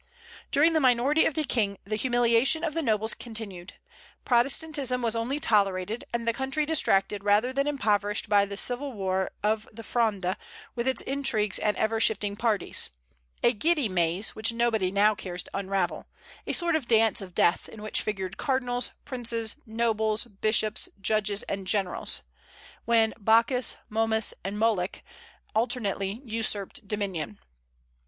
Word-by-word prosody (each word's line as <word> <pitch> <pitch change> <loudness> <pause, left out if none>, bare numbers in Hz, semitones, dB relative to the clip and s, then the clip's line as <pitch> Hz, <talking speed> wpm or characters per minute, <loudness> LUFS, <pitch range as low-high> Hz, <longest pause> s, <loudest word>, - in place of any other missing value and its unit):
During 320 +4 +3
the 315 - +3
minority 260 +3 +3
of 315 - -3
the 310 - 0
King 210 -8 0
the 215 +2 -2
humiliation 245 +5 +3
of 320 -3 -1
the 330 - 0
nobles 220 -4 +1
continued. 210 -6 -7 0.5
Protestantism 260 +1 +2
was 230 -1 +1
only 245 +6 -1
tolerated, 205 -2 +1
and 235 -1 -3
the 230 - +2
country 270 +4 -1
distracted 205 -10 +2
rather 210 +5 +2
than 275 +2 0
impoverished 210 -7 0
by 205 -1 +4
the 200 0 -6
civil 250 +5 +2
war 190 -2 -1
of 215 +1 0
the 225 +1 -10
Fronde, 210 -6 0 0.4
with 240 +1 -3
its 260 - +1
intrigues 245 -7 0
and 210 -1 0
ever 220 +1 0
shifting 205 -2 +1
parties, 220 -2 0 0.5
a 240 - +4
giddy 300 +3 +1
maze, 180 +1 +1
which 220 +1 +1
nobody 230 -5 +1
now 205 +2 +4
cares 180 -4 -5
to - - -14
unravel; 195 -2 -2 0.4
a - - 0
sort 340 -2 +3
of 290 -6 -2
dance 225 -1 +3
of 185 -2 -10
death, 170 - +2
in 215 -1 -11
which 215 - 0
figured 190 -2 -4
cardinals, 250 -3 -1
princes, 235 -4 -3
nobles, 220 -1 0
bishops, 215 0 +1
judges, 205 0 0
and 195 -1 -5
generals, 195 -2 0 0.6
when 225 -1 +3
"Bacchus, 230 +4 +3
Momus, 220 0 +1
and 195 +2 -4
Moloch" 210 -4 0 0.5
alternately 220 -1 -1
usurped 220 +1 -3
dominion. 190 - -3
220 Hz, 150 wpm, -27 LUFS, 200-245 Hz, 0.6 s, by